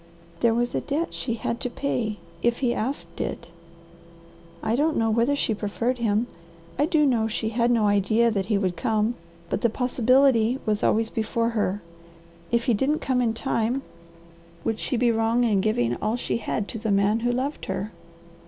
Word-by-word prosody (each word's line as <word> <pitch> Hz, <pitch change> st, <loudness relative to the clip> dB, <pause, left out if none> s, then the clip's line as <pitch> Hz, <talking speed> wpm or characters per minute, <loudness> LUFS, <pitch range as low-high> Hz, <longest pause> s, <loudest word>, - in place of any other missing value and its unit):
"There 230 Hz, -1 st, +3 dB
was 240 Hz, +1 st, 0 dB
a -, -, 0 dB
debt 305 Hz, +4 st, -2 dB
she 235 Hz, -, -2 dB
had 235 Hz, +1 st, -3 dB
to 250 Hz, -, -2 dB
pay 235 Hz, -5 st, -2 dB, 0.2 s
if 235 Hz, 0 st, +2 dB
he 245 Hz, -3 st, +1 dB
asked 260 Hz, +6 st, -4 dB
it. -, -, -5 dB, 1.1 s
I 220 Hz, -, +1 dB
don't 305 Hz, +4 st, +1 dB
know 225 Hz, -1 st, +2 dB
whether 235 Hz, +6 st, +2 dB
she 235 Hz, -, 0 dB
preferred 230 Hz, +4 st, -2 dB
him. 220 Hz, 0 st, +1 dB, 0.5 s
I 295 Hz, -, +3 dB
do 310 Hz, -3 st, +3 dB
know 235 Hz, -5 st, +2 dB
she 220 Hz, 0 st, -2 dB
had 235 Hz, +1 st, +1 dB
no 230 Hz, -3 st, +3 dB
idea 215 Hz, +3 st, +3 dB
that 195 Hz, -3 st, -1 dB
he 210 Hz, -, +2 dB
would 185 Hz, -3 st, 0 dB
come, 220 Hz, 0 st, +1 dB, 0.3 s
but 200 Hz, -, -2 dB
the 235 Hz, -, +3 dB
POSSIBILITY 250 Hz, 0 st, +3 dB
was 215 Hz, -1 st, 0 dB
always 225 Hz, +1 st, +2 dB
before 230 Hz, +1 st, 0 dB
her. 205 Hz, -3 st, -1 dB, 0.7 s
If 235 Hz, 0 st, +2 dB
he 240 Hz, -, +2 dB
didn't 270 Hz, +8 st, +1 dB
come 255 Hz, -4 st, 0 dB
in 225 Hz, -2 st, +1 dB
time, 245 Hz, +1 st, -1 dB, 0.8 s
would 225 Hz, -1 st, -1 dB
she 255 Hz, -, -1 dB
be 240 Hz, 0 st, +3 dB
wrong 225 Hz, +2 st, +2 dB
in 210 Hz, -5 st, +2 dB
giving 120 Hz, -, +1 dB
all 215 Hz, +2 st, -1 dB
she 245 Hz, -, -2 dB
had 210 Hz, -2 st, -2 dB
to 225 Hz, -, -5 dB
the 220 Hz, 0 st, -3 dB
man 200 Hz, +2 st, +3 dB
who 240 Hz, +1 st, 0 dB
loved 260 Hz, +4 st, -2 dB
her?" 195 Hz, +2 st, -3 dB
230 Hz, 190 wpm, -25 LUFS, 215-245 Hz, 1.1 s, There